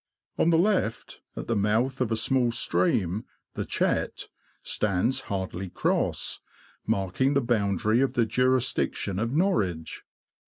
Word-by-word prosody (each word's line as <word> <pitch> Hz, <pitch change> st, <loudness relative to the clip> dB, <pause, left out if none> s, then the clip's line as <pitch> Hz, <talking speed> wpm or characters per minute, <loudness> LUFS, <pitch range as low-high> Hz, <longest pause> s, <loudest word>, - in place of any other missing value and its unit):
On 165 Hz, -, +4 dB
the 165 Hz, -, +4 dB
left, 180 Hz, -, 0 dB
at -, -, -5 dB
the 115 Hz, -, -1 dB
mouth 115 Hz, +6 st, +1 dB
of 120 Hz, -3 st, 0 dB
a -, -, +2 dB
small 120 Hz, +2 st, +2 dB
stream, 95 Hz, -2 st, 0 dB, 0.3 s
the -, -, -3 dB
Chet, -, -, -1 dB, 0.3 s
stands 105 Hz, +5 st, 0 dB
Hardley 95 Hz, -1 st, -3 dB
Cross, -, -, 0 dB, 0.5 s
marking 100 Hz, +9 st, +1 dB
the -, -, +5 dB
boun 105 Hz, -6 st, +1 dB
dary 110 Hz, +7 st, +2 dB
of 135 Hz, -, +1 dB
the 120 Hz, -, +2 dB
jurisdiction 125 Hz, -4 st, 0 dB
of 115 Hz, +2 st, -1 dB
Norwich. 105 Hz, -, 0 dB
115 Hz, 135 wpm, -27 LUFS, 100-130 Hz, 0.5 s, the